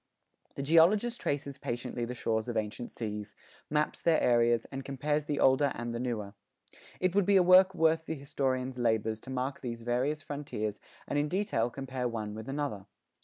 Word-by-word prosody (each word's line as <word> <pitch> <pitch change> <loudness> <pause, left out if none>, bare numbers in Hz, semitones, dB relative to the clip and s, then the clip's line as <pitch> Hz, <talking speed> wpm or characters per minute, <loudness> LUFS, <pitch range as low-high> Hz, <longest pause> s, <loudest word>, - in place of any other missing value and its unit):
The 140 - -3
geologist 190 - +4
traces 140 -1 -2
patiently 120 -1 -3
the 125 +1 -5
shores 110 -1 -1
of 115 - -2
ancient 110 +2 -3
seas, 105 -2 -5 0.3
maps 150 0 0
their 165 -2 +4
areas, 120 -1 +3
and 135 0 -5
compares 145 +2 -1
the 145 -1 -2
older 135 +1 +4
and 120 0 -4
the 120 - -3
newer. 110 -5 -3 0.7
It 185 -1 +1
would 200 -2 +2
be 200 - +5
a 185 - +6
work 185 +1 +6
worth 160 -1 +2
the 160 - -2
historian's 130 -2 -2
labors 110 -2 0
to - - -11
mark 130 +1 -3
these 115 -2 -5
various 130 +6 0
frontiers 125 -8 -4 0.3
and 145 - 0
in 150 +1 0
detail 185 - 0
compare 130 0 -3
one 110 -3 -4
with 110 +3 -7
another. 135 -9 -3
130 Hz, 180 wpm, -30 LUFS, 115-150 Hz, 0.7 s, a